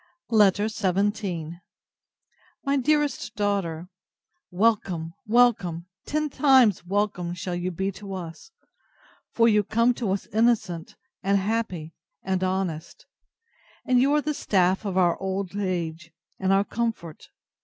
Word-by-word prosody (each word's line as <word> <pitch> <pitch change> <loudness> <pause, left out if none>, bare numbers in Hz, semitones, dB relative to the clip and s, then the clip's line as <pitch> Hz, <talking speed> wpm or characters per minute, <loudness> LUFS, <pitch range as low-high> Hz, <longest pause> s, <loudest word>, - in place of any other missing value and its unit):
v - - +1
LETTER 205 0 +4
XVII 195 -5 -1 1.1
MY 280 0 +2
DEAREST 285 -5 0
DAUGHTER, 195 -5 -1 0.6
Welcome, 180 -5 0
welcome, 210 -8 +2 0.2
ten 305 +1 0
times 260 - +4
welcome 185 -2 -1
shall 180 +1 -4
you 175 +1 -2
be 190 +3 -2
to 195 0 -8
us; 170 - -8 0.8
for 230 0 +3
you 210 -2 +4
come 230 +4 +2
to 235 -4 -3
us 195 +1 -1
innocent, 215 -7 +1 0.3
and 200 +1 +2
happy, 190 -6 -2 0.3
and 190 -1 -1
honest; 185 -3 -3 0.8
and 250 -2 +3
you 275 +2 +3
are 300 - +3
the 300 +2 -1
staff 190 -5 +1
of 190 -2 -2
our 175 -2 +2
old 190 0 -3
age, 170 -4 -3 0.3
and 190 0 +1
our 195 +1 +4
comfort. 215 -8 -4
195 Hz, 130 wpm, -25 LUFS, 175-225 Hz, 1.1 s, LETTER